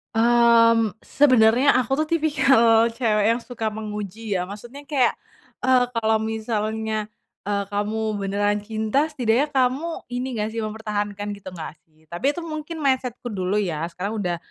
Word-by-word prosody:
Mmm, 230 Hz, -1 st, +5 dB, 0.2 s
sebenernya 255 Hz, -2 st, +4 dB
aku 255 Hz, 0 st, -1 dB
tuh 310 Hz, -, -1 dB
tipikal 265 Hz, -7 st, +4 dB
cewek 215 Hz, -4 st, +2 dB
yang 230 Hz, +1 st, +1 dB
suka 225 Hz, -3 st, -2 dB
menguji 210 Hz, 0 st, -5 dB
ya, 180 Hz, -, 0 dB
maksudnya 240 Hz, +7 st, -9 dB
kayak, 265 Hz, -5 st, +3 dB, 0.5 s
eee, 255 Hz, -1 st, +4 dB
kalau 220 Hz, -1 st, +2 dB
misalnya, 220 Hz, -1 st, -2 dB, 0.4 s
eee, 200 Hz, -1 st, 0 dB
kamu 210 Hz, +1 st, -2 dB
beneran 205 Hz, +1 st, 0 dB
cinta 220 Hz, +6 st, 0 dB
setidaknya 275 Hz, 0 st, 0 dB
kamu 270 Hz, +6 st, 0 dB
ini 245 Hz, +1 st, -3 dB
nggak 215 Hz, -1 st, -2 dB
sih 225 Hz, 0 st, -4 dB
mempertahankan 210 Hz, -1 st, -4 dB
gitu 190 Hz, -2 st, -10 dB
nggak 160 Hz, -3 st, -7 dB
sih? 155 Hz, 0 st, -30 dB
Tapi 175 Hz, +9 st, -5 dB
itu 345 Hz, -, -6 dB
mungkin 315 Hz, 0 st, -6 dB
mindset-ku 255 Hz, -3 st, -1 dB
dulu 200 Hz, +1 st, -1 dB
ya 165 Hz, -4 st, -2 dB
sekarang 190 Hz, +6 st, -5 dB
udah, 175 Hz, -4 st, -1 dB
220 Hz, 150 wpm, -23 LUFS, 205-250 Hz, 0.5 s, Mmm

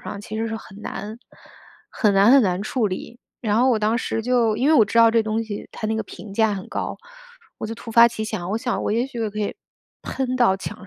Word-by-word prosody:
上 200 Hz, -, -7 dB
其 215 Hz, +1 st, -7 dB
实 225 Hz, -, -1 dB
是 225 Hz, -, -3 dB
很 205 Hz, -2 st, -12 dB
难 215 Hz, +3 st, -6 dB, 0.7 s
很 210 Hz, -4 st, +1 dB
难 200 Hz, +3 st, +6 dB
很 275 Hz, -, +8 dB
难 185 Hz, -1 st, 0 dB
处 225 Hz, 0 st, 0 dB
理。 215 Hz, +5 st, -6 dB, 0.2 s
然 215 Hz, -2 st, +1 dB
后 255 Hz, +1 st, +4 dB
我 230 Hz, -, +2 dB
当 215 Hz, +2 st, +1 dB
时 225 Hz, -, -2 dB
就 240 Hz, -2 st, +2 dB
因 265 Hz, +5 st, +1 dB
为 315 Hz, -, +5 dB
我 220 Hz, -, +6 dB
知 230 Hz, +3 st, 0 dB
道 230 Hz, 0 st, +7 dB
这 225 Hz, -1 st, +3 dB
东 220 Hz, +1 st, -1 dB
西 210 Hz, -2 st, -6 dB
它 215 Hz, -, -4 dB
那 220 Hz, 0 st, -1 dB
个 220 Hz, -, -1 dB
评 210 Hz, -2 st, -11 dB
价 220 Hz, -1 st, +3 dB
很 190 Hz, -1 st, -7 dB
高， -, -, -4 dB, 0.6 s
我 -, -, -4 dB
就 225 Hz, -, -5 dB
突 230 Hz, -, -10 dB
发 235 Hz, +1 st, +8 dB
奇 230 Hz, -2 st, -3 dB
想， 190 Hz, -5 st, -4 dB
我 220 Hz, -, 0 dB
想 245 Hz, 0 st, -2 dB
我 -, -, 0 dB
也 235 Hz, +4 st, +1 dB
许 245 Hz, -3 st, -9 dB
我 215 Hz, -, -2 dB
可 210 Hz, -, -7 dB
以 210 Hz, -, -3 dB, 0.5 s
喷 255 Hz, -1 st, -2 dB
到 240 Hz, -6 st, +4 dB
墙 195 Hz, 0 st, -8 dB
220 Hz, 275 characters per minute, -22 LUFS, 210-235 Hz, 0.7 s, 很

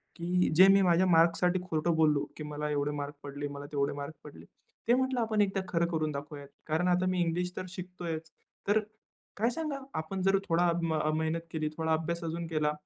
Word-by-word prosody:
की 180 Hz, +1 st, +1 dB
जे 185 Hz, +4 st, +9 dB
मी 195 Hz, 0 st, +6 dB
माझ्या 180 Hz, 0 st, +4 dB
मार्क्ससाठी 175 Hz, +2 st, +4 dB
खोटं 170 Hz, -1 st, 0 dB
बोललो, 150 Hz, -3 st, +3 dB
की 155 Hz, -, -5 dB
मला 150 Hz, 0 st, -4 dB
एवढे 145 Hz, 0 st, 0 dB
मार्क 145 Hz, 0 st, -4 dB
पडले, 145 Hz, 0 st, -5 dB
मला 140 Hz, 0 st, -7 dB
तेवढे 140 Hz, 0 st, 0 dB
मार्क 145 Hz, +2 st, -6 dB
पडले. 150 Hz, -, -12 dB, 0.4 s
ते 235 Hz, -, +5 dB
म्हटलं 260 Hz, 0 st, +1 dB
आपण 220 Hz, -2 st, +1 dB
एकदा 195 Hz, -1 st, +1 dB
खरं 170 Hz, -1 st, +1 dB
करून 155 Hz, -2 st, 0 dB
दाखवूयात. 145 Hz, 0 st, -7 dB, 0.2 s
कारण 160 Hz, +3 st, +1 dB
आता 180 Hz, +1 st, +3 dB
मी 185 Hz, -1 st, 0 dB
इंग्लिश 175 Hz, +1 st, 0 dB
तर -, -, -3 dB
शिकतोयच, 175 Hz, -3 st, -6 dB, 0.4 s
तर 205 Hz, +2 st, +4 dB, 0.6 s
काय 225 Hz, +3 st, +2 dB
सांगावा 280 Hz, 0 st, -4 dB
आपण 175 Hz, +5 st, -4 dB
जर 195 Hz, +1 st, +4 dB
थोडी 170 Hz, 0 st, +2 dB, 0.3 s
मेहनत 160 Hz, +1 st, -1 dB
केली, 155 Hz, -1 st, -1 dB
थोडा 160 Hz, 0 st, +1 dB
अभ्यास 170 Hz, +2 st, -1 dB
अजून 165 Hz, +1 st, -3 dB
केला, 155 Hz, -2 st, +1 dB
165 Hz, 190 wpm, -30 LUFS, 155-185 Hz, 0.6 s, जे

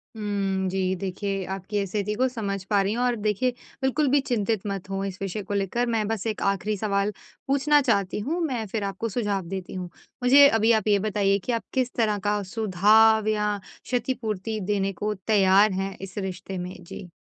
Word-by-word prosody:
उम, 200 Hz, -3 st, -1 dB
जी 185 Hz, 0 st, 0 dB
देखिए, 195 Hz, +1 st, -2 dB
आपकी 195 Hz, +2 st, -3 dB
स्थिति 205 Hz, +2 st, -2 dB
को 255 Hz, +4 st, +2 dB
समझ 200 Hz, -6 st, -3 dB
पा 205 Hz, -2 st, +3 dB
रही 195 Hz, +2 st, 0 dB
हूँ 240 Hz, +2 st, -1 dB
और 245 Hz, -1 st, +2 dB
देखिए 215 Hz, +3 st, 0 dB, 0.3 s
बिल्कुल 275 Hz, +3 st, +1 dB
भी 280 Hz, +2 st, +4 dB
चिंतित 225 Hz, -6 st, -1 dB
मत 195 Hz, -1 st, -4 dB
हों 195 Hz, 0 st, -2 dB
इस 190 Hz, -2 st, -5 dB
विषय 195 Hz, +2 st, -3 dB
को 200 Hz, -, -5 dB
लेकर। 200 Hz, +5 st, 0 dB
मैं 225 Hz, -3 st, 0 dB
बस 225 Hz, 0 st, -2 dB
एक 215 Hz, -, -3 dB
आखिरी 200 Hz, +2 st, 0 dB
सवाल 200 Hz, 0 st, 0 dB, 0.4 s
पूछना 280 Hz, +2 st, +4 dB
चाहती 205 Hz, -7 st, +1 dB
हूँ, 305 Hz, +12 st, -2 dB
मैं 245 Hz, -7 st, -2 dB
फिर 210 Hz, +1 st, -3 dB
आपको 200 Hz, +3 st, -3 dB
सुझाव 205 Hz, -4 st, -1 dB
देती 190 Hz, 0 st, -5 dB
हूँ। 180 Hz, -1 st, -5 dB, 0.3 s
मुझे 280 Hz, +3 st, +8 dB
अभी 225 Hz, -3 st, +3 dB
आप 220 Hz, -2 st, +2 dB
ये 205 Hz, -1 st, +4 dB
बताइए 200 Hz, -1 st, +1 dB
कि -, -, -1 dB
आप 230 Hz, -1 st, -1 dB
किस 255 Hz, -1 st, 0 dB
तरह 215 Hz, -4 st, +1 dB
का 205 Hz, 0 st, +1 dB
सुधाब 215 Hz, +2 st, +4 dB
या 210 Hz, -1 st, +1 dB, 0.3 s
क्षतिपूर्ति 225 Hz, -4 st, -2 dB
देने 195 Hz, 0 st, -1 dB
को 210 Hz, +3 st, -2 dB
तैयार 200 Hz, -1 st, +5 dB
हैं 190 Hz, +1 st, -3 dB
इस 195 Hz, 0 st, -9 dB
रिश्ते 190 Hz, -1 st, -4 dB
में? 180 Hz, +1 st, -5 dB
जी। 175 Hz, +1 st, -9 dB
205 Hz, 195 wpm, -25 LUFS, 195-225 Hz, 0.4 s, मुझे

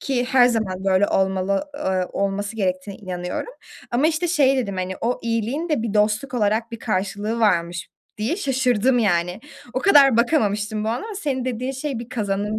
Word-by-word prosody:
Ki 250 Hz, -3 st, 0 dB
her 250 Hz, -1 st, +5 dB
zaman 200 Hz, -6 st, -1 dB
böyle 195 Hz, +1 st, +3 dB
olmalı, 190 Hz, +7 st, 0 dB
eee, 190 Hz, -9 st, -1 dB
olması 200 Hz, +2 st, -2 dB
gerektiğine 190 Hz, 0 st, -2 dB
inanıyorum. 180 Hz, -, -5 dB, 0.4 s
Ama, 255 Hz, +6 st, +2 dB
işte, 330 Hz, +2 st, 0 dB
şey 275 Hz, -5 st, +3 dB
dedim, 200 Hz, -7 st, -2 dB
hani, 185 Hz, 0 st, -2 dB
"O 245 Hz, +2 st, 0 dB
iyiliğin 235 Hz, +8 st, -1 dB
de 295 Hz, -8 st, 0 dB
bir 220 Hz, -2 st, -3 dB
dostluk 210 Hz, +5 st, +1 dB
olarak 220 Hz, +1 st, +1 dB
bir 230 Hz, -, -5 dB
karşılığı 205 Hz, +2 st, -2 dB
varmış." 175 Hz, -4 st, +1 dB, 0.3 s
diye 245 Hz, -, -1 dB
şaşırdım, 255 Hz, -, +2 dB
yani. 180 Hz, -2 st, +1 dB, 0.3 s
O -, -, +1 dB
kadar 280 Hz, -, +6 dB
bakamamıştım 215 Hz, -5 st, +1 dB
bu -, -, -1 dB
ama 240 Hz, -, -2 dB
senin 265 Hz, -7 st, -2 dB
dediğin 255 Hz, +1 st, -2 dB
şey 265 Hz, -2 st, -4 dB
bir 235 Hz, 0 st, -8 dB
kazanım 210 Hz, -2 st, -2 dB
220 Hz, 170 wpm, -22 LUFS, 195-255 Hz, 0.4 s, kadar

